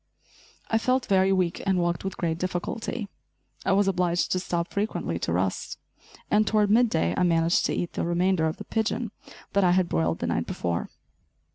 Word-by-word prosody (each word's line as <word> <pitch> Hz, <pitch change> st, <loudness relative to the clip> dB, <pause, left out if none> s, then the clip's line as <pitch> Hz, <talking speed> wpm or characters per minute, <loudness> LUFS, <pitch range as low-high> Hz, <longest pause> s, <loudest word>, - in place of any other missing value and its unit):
I 225 Hz, -, +3 dB
felt 255 Hz, +2 st, +1 dB
very 190 Hz, -1 st, +3 dB
weak 185 Hz, -2 st, +1 dB
and 195 Hz, -1 st, +1 dB
walked 175 Hz, -1 st, 0 dB
with 195 Hz, -, -4 dB
great 165 Hz, -1 st, -1 dB
difficulty. 190 Hz, +5 st, -3 dB, 0.6 s
I -, -, +2 dB
was 200 Hz, 0 st, +3 dB
obliged 180 Hz, -2 st, +1 dB
to 185 Hz, -, +2 dB
stop 175 Hz, -2 st, -3 dB
frequently 200 Hz, -, -2 dB
to -, -, -2 dB
rest, 90 Hz, +2 st, -1 dB, 0.5 s
and 215 Hz, +1 st, +4 dB
toward 210 Hz, -2 st, +3 dB
mid 235 Hz, +2 st, +5 dB
day 85 Hz, -, +1 dB
I -, -, 0 dB
managed 165 Hz, -1 st, +3 dB
to -, -, -1 dB
eat 175 Hz, -, -3 dB
the -, -, -2 dB
remainder 175 Hz, -1 st, +2 dB
of 155 Hz, -, -3 dB
the -, -, -7 dB
pigeon 225 Hz, 0 st, -1 dB, 0.4 s
that 200 Hz, -, +3 dB
I 175 Hz, -1 st, +4 dB
had 185 Hz, -1 st, +2 dB
broiled 80 Hz, -, 0 dB
the -, -, -3 dB
night -, -, -1 dB
before. 85 Hz, -1 st, -2 dB
185 Hz, 190 wpm, -26 LUFS, 170-205 Hz, 0.6 s, mid